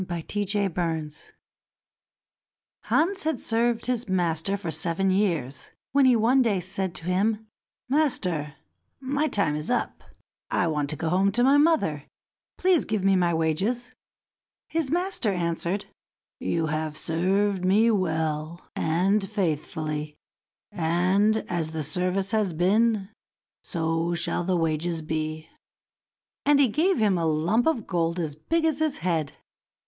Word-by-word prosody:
Hans 185 +3 -3
in 200 -4 0
Luck 160 -4 -2 1.7
Hans 380 +5 +1
had 315 -5 -1
served 235 0 0
his 245 -4 -2
master 175 +1 0
for 175 -5 -4
seven 185 +3 0
years, 165 -10 -1 0.2
when 275 0 +4
he 250 - +5
one 235 +4 +4
day 215 -6 +2
said 185 0 -3
to - - -7
him: 210 +4 0 0.4
"Master, 185 - 0 0.4
my 285 +3 0
time 200 - 0
is 150 +1 -4
up; 245 - -1 0.5
I 180 - +1
want 150 -3 -1
to 155 - -1
go 160 +2 -2
home 190 +3 +3
to 245 +3 +2
my 275 +3 +5
mother; 290 - +2 0.5
please 365 -3 +3
give 215 -3 -2
me 195 0 +4
my 175 -2 +2
wages." 190 +10 -1 0.8
His 320 -4 -1
master 350 - 0
answered, 175 +2 -2 0.5
"You 165 -1 -1
have 155 0 -2
served 190 +3 0
me 210 +5 +4
well 160 -4 -1
and 195 +5 +1
faithfully, 155 -5 -2 0.6
and 185 +6 +2
as 170 -3 -2
the 160 -1 -2
service 180 +6 -1
has 210 -5 +1
been, 200 +4 +2 0.5
so 165 0 -1
shall 170 +1 0
the 185 0 +1
wages 165 0 -1
be." 155 0 -3 1.0
And 290 0 +4
he 275 -4 +5
gave 340 - +2
him 200 -5 +2
a 165 - 0
lump 165 - +1
of 255 -10 0
gold 170 -2 -1
as 155 -4 -2
big 325 - -1
as 315 -2 +1
his 310 -2 0
head. 160 -5 0
185 Hz, 140 wpm, -26 LUFS, 160-225 Hz, 1.7 s, he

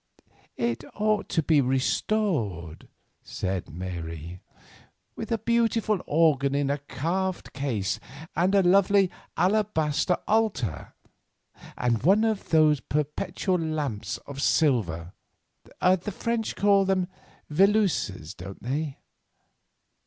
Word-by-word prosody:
"It 120 0 -1
ought 210 0 0
to 160 - +1
be 150 -1 +4
restored," 130 - -1 0.3
said 95 -1 -4
Mary, 85 -1 -6 0.8
"with 225 - -6
a 230 - +2
beautiful 225 -3 +1
organ 145 -3 +3
in 140 -1 +1
a 145 - -1
carved 170 +8 -3
case 115 -9 -2 0.4
and 185 +4 +2
a 195 - +5
lovely 195 +1 +4 0.3
alabaster 180 -3 +1
altar 210 - 0 0.8
and 120 -2 +1
one 195 - +4
of 220 -3 -1
those 155 -3 +4
perpetual 170 - -1
lamps 150 -9 -3
of 140 -1 -7
silver—the 130 - -1
French 230 +3 -2
call 200 0 +4
them 185 -1 +1 0.4
'veilleuses', 155 - +2
don't 95 +2 -10
they? 140 +3 -2
155 Hz, 100 wpm, -26 LUFS, 120-195 Hz, 0.8 s, a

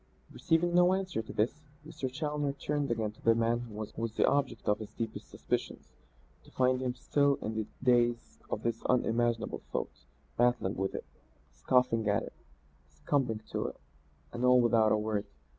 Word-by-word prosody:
Receiving 170 +2 +1
no 180 +1 +5
answer 185 -10 -2
to 110 - -9
this, 110 +3 +1 0.3
Mr. 135 -5 -4
Challoner 150 0 -2
turned 145 0 -2
again 110 -3 -1
to 110 - -22
the 115 0 +4
man 115 +1 +1
who 120 -3 -8
was 110 +1 -4
the - - +4
object 135 -5 0
of 105 - +2
his 110 - -9
deepest 115 -1 -5
suspicions, - - -4 0.5
to - - -17
find 130 0 +2
him 125 -1 -2
still 140 -1 +2
in 110 - -4
the 110 -1 -3 0.2
daze 120 -1 +2
of - - -3
that 115 -1 -1
unimaginable 120 -2 +1
thought, - - -4 0.3
battling 120 -5 +2
with 95 +1 -2
it, - - -5 0.5
scoffing 115 - +2
at 100 - +2
it, - - -9 0.6
succumbing 125 -7 -1
to - - -1
it - - -7 0.6
and 120 +1 -4
all 125 0 +6
without 115 -2 +4
a - - +4
word. 105 -1 -2
120 Hz, 175 wpm, -31 LUFS, 110-135 Hz, 0.6 s, all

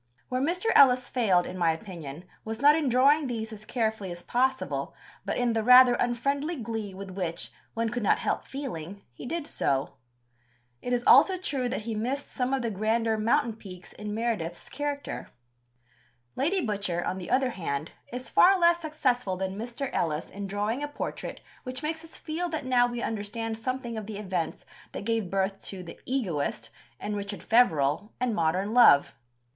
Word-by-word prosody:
Where 255 0 -1
Mr. 360 +9 +1
Ellis 255 -2 +6
failed, 190 -8 +3
in 185 - -6
my 170 -1 +3
opinion, 165 -4 -8 0.2
was 220 0 -5
not 290 +3 +7
in 310 -4 +1
drawing 275 +4 +4
these 225 -2 -4
as 215 0 -10
carefully 220 -6 -1
as 175 0 -8
possible, 260 +2 -1 0.3
but - - -1
in 245 -2 +1
the 225 - +1
rather 250 +2 +8
unfriendly 275 +7 0
glee 225 -6 -5
with 195 0 -7
which, 180 -3 -3 0.2
one 230 0 0
could 240 +1 -3
not 205 - +3
help - - -2
feeling, 200 - -6
he 180 - -9
did 330 +1 -3
so. 135 - -1 0.8
It 245 - -4
is 245 -1 +1
also 370 +9 +7
true 270 -8 -2
that 245 - -2
he 225 0 -3
missed 250 +7 -3
some 255 -1 -1
of 270 -2 0
the 230 - -1
grander 220 +2 +1
mountain 235 +3 +2
peaks 185 -4 -11
in 210 0 -6
Meredith's 215 -8 -3
character. 290 -1 -4 1.1
Lady 350 +8 +1
Butcher, 200 -5 -1
on 185 - -2
the 180 - -7
other 260 0 +2
hand, 155 -6 -3 0.2
is 250 +1 -6
far 385 +2 +6
less 340 0 +5
successful 255 - 0
than 190 0 -3
Mr. 240 +5 -4
Ellis 155 -1 -1
in 200 +1 -5
drawing 205 +6 -1
a 295 - -2
portrait 290 - -5 0.2
which 255 +2 -6
makes 320 +1 -3
us 330 - -10
feel 340 +3 -3
that 315 -4 -3
now 245 -1 +4
we 240 -1 -4
understand 225 +1 -3
something 240 0 -3
of 210 - -8
the 215 -2 -5
events 185 -5 -3 0.3
that - - -6
gave 225 -4 0
birth 195 +1 -1
to 190 -2 -5
The 170 - -10
Egoist 195 - -2 0.3
and 210 - -3
Richard 200 0 -5
Feverel 170 - +3
and 250 -2 0
Modern 185 +4 0
Love. 235 -13 +6
230 Hz, 180 wpm, -28 LUFS, 195-260 Hz, 1.1 s, rather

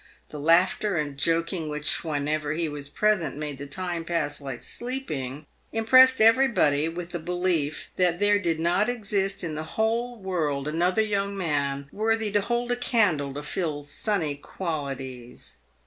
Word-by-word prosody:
The 150 - -7
laughter 180 +6 +3
and 150 -3 -2
joking 165 +2 0
which 150 0 0
whenever 150 -1 -1
he 165 +1 -1
was 145 -1 -7
present 180 -6 +1
made 150 -2 -5
the 140 - -6
time 175 +2 -3
pass 155 -4 -2
like 135 -3 -6
sleeping, 155 - -5 0.3
impressed 255 +4 +6
everybody 220 - +4
with 170 +1 -6
the 175 - -3
belief 175 -3 -1
that 180 -2 +2
there 205 +1 +3
did 165 -5 -1
not 175 +7 +2
exist 200 -5 -1
in 165 -2 -3
the 155 - -3 0.2
whole 230 +3 0
world 160 -8 -2
another 180 +7 +2
young 200 -1 -1
man 140 -5 -1
worthy 220 0 0
to 205 0 +2
hold 240 +3 -1
a - - +2
candle 200 - +1
to 145 - -5
Phil's 150 -2 -3
sunny 190 -9 -1
qualities. 135 -6 -6
170 Hz, 155 wpm, -26 LUFS, 145-205 Hz, 0.3 s, impressed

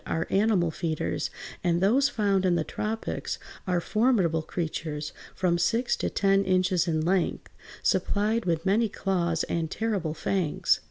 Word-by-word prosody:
165), - - -1 0.2
are 195 - +5
animal 185 -7 +2
feeders, 160 -1 -2 0.3
and 170 -1 +2
those 250 +9 +4
found 200 -7 +1
in 180 -2 +3
the 165 - +1
tropics 220 +7 -3 0.3
are 180 -1 +2
formidable 195 -6 +2
creatures 155 -2 -4 0.2
from 175 -2 +1
six 230 +8 +1
to - - -2
ten 195 0 +2
inches 185 -2 +2
in 160 -2 +1
length, 180 +2 0 0.3
supplied 215 +3 +1
with 165 -1 0
many 215 +4 +3
claws 170 -5 0
and 165 -2 -2
terrible 195 -8 -2
fangs. 180 -5 +1
185 Hz, 150 wpm, -27 LUFS, 170-205 Hz, 0.3 s, are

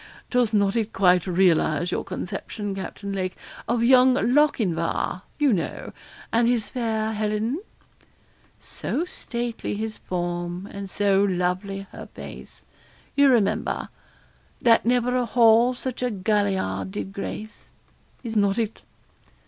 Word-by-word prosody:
Does 245 -3 +2
not 200 -1 +2
it 225 -2 -1
quite 180 -2 +4
realise 175 -2 +2
your - - -1
conception, 200 +2 -5
Captain 195 +1 -6
Lake, 185 -1 -2 0.3
of 235 0 +1
young 255 +1 +6
Lochinvar, 225 - +1 0.2
you 290 -5 +3
know, 175 - -3 0.4
and 230 +1 +4
his 240 -3 +1
fair 220 -3 -1
Helen 215 +6 -1 1.0
So 335 - -3
stately 235 -10 -4
his 215 +1 -4
form 175 +1 -3
and 200 -1 -6
so 200 0 +2
lovely 190 +1 -1
her - - -9
face - - -10 0.5
You 280 -1 +6
remember 230 -6 +1 0.7
'That 230 -1 +4
never 245 0 +2
a 250 -1 +1
hall 235 +1 +5
such 255 0 -5
a 250 - +1
galliard 190 - 0
did 190 - -5
grace. 210 +2 -7 0.5
Is 230 -2 -5
not 200 0 +2
it?' 225 -2 -2
210 Hz, 125 wpm, -24 LUFS, 190-240 Hz, 1.0 s, young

